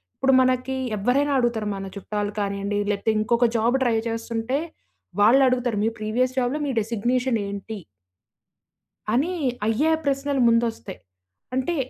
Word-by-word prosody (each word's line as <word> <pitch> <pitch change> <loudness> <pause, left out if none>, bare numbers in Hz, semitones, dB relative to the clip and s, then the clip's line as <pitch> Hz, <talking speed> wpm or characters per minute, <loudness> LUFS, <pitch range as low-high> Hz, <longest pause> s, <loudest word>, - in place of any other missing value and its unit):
ఇప్పుడు 270 0 +2
మనకి 255 +1 +1 0.2
ఎవ్వరైనా 275 +8 +1
అడుగుతారు. 230 -3 0
మన 195 0 -6
చుట్టాలు 205 +1 -3
కాని‌యండి, 200 0 -2
లేకపోతే 205 +2 0
ఇంకొక 235 +2 +2
జాబు 235 +4 +2
ట్రై 235 -3 +2
చేస్తుంటే, 230 +2 -2 0.6
వాళ్ళు 240 +6 +6
అడుగుతారు. 245 -4 0
"మీ - - +3
ప్రీవియస్ 250 +5 0
జాబ్‌లో 255 +4 0
మీ 275 - -1
డెజిగ్నేషనేంటి?" 225 -2 -2 1.3
అని 300 +9 +1 0.3
అయ్యే 230 +9 +2
ప్రశ్నలు 275 0 0
ముందు 230 0 +4
వస్తాయి. 200 -3 -10 0.6
అంటే 260 +7 0
235 Hz, 125 wpm, -24 LUFS, 215-260 Hz, 1.3 s, వాళ్ళు